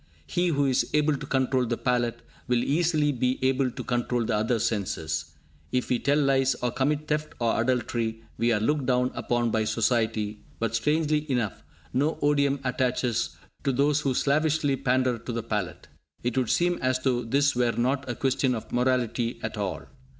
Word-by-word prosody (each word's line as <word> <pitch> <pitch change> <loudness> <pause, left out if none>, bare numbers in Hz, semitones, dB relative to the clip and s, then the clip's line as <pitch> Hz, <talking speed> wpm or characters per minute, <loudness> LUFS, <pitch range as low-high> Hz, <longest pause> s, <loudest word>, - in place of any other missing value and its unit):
He 175 0 0
who 145 -4 +2
is 130 -2 +1
able 150 0 +3
to - - -7
control 130 -2 +1
the 120 0 -1
palate, 120 -1 0 0.2
will 120 -1 +2
easily 155 -1 +2
be 125 -1 0
able 130 0 +2
to - - -7
control 120 -1 0
the - - 0
other 110 +3 +1
senses. 80 -8 -2 0.4
If 125 0 -1
we 125 - +2
tell 145 +1 +2
lies, 135 -2 +3
or 125 0 -2
commit 150 +4 0
theft 150 0 -1
or 115 -1 +1
adultery, 115 -2 -1
we 115 +2 +1
are 110 - +2
looked 140 +5 0
down 125 0 +2
upon 120 -1 0
by 110 -1 +1
society, 110 -1 0
but, 115 -1 -2
strangely 150 +4 +1
enough, 120 -6 -1 0.3
no 145 +5 +1
odium 140 -1 +2
attaches 125 -2 0 0.3
to 135 - +2
those 140 +3 +2
who 135 -4 0
slavishly 150 0 +2
pander 130 -2 +1
to 120 - -6
the 115 -1 -3
palate! 90 -6 -3 0.4
It 120 -1 -1
would 130 -3 +1
seem 175 0 +2
as 130 0 +2
though 130 -2 0
this 140 +4 +2
were 120 -1 +2
not 130 +2 0
a 120 - -2
question 130 0 +1
of 110 - -7
morality 120 -1 0
at 110 - -3
all! 100 -3 -3
125 Hz, 180 wpm, -26 LUFS, 115-140 Hz, 0.4 s, able